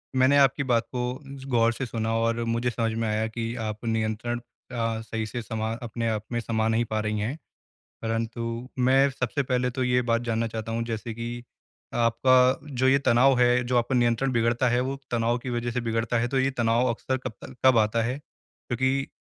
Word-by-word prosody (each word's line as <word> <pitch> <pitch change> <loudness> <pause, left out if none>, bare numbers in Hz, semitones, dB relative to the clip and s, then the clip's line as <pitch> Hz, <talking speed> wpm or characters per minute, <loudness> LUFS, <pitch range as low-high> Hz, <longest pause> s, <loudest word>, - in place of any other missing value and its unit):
मैंने 130 +2 +5
आपकी 140 0 +4
बात 120 -3 +2
को 125 -1 -2 0.5
गौर 115 -1 +3
से 130 - -4
सुना 110 -1 -2
और 115 +1 0
मुझे 115 +1 0
समझ 115 -1 -1
में 115 0 -1
आया 110 +1 0
कि 115 +1 -4
आप 105 +2 -5
नियंत्रण 115 +1 -1 0.3
अ, 115 -2 -1
सही 110 0 -4
से 120 +3 -5
समा 110 -1 -3
अपने 115 0 -3
आप 110 -1 -2
में 120 - 0
समाँ 110 -1 0
नहीं 115 +1 +2
पा 110 0 -2
रही 105 0 -1
हैं। 120 +9 -2 0.6
परंतु 115 +1 -2 0.4
मैं 135 +2 +4
सबसे 140 +1 -2
पहले 125 0 0
तो 130 0 -2
ये 125 0 +2
बात 115 +1 +3
जानना 115 -1 -1
चाहता 110 0 -5
हूँ 115 0 -1
जैसे 115 0 -4
कि 120 +1 -5 0.5
आपका 120 +2 +3 0.5
जो 130 - +5
ये 135 +1 +5
तनाव 125 +2 +5
है 125 0 +4
जो 125 0 +1
आपका 120 +2 +1
नियंत्रण 120 +2 +2
बिगड़ता 120 +1 +2
है 120 +1 +2
वो 135 +2 -2 0.2
तनाव 120 +1 +1
की 125 +1 -6
वज़ह 120 0 -2
से 125 +1 -2
बिगड़ता 115 +1 0
है 120 - +1
तो 135 +1 0
ये 135 +1 +2
तनाव 120 +2 +2
अक्सर 130 +3 -1
कब 130 -3 -6
तक 130 - -10
कब 130 -3 +7
आता 110 +1 +2
है? 125 +4 -2
क्योंकि 130 -1 -3
120 Hz, 205 wpm, -26 LUFS, 115-125 Hz, 0.6 s, कब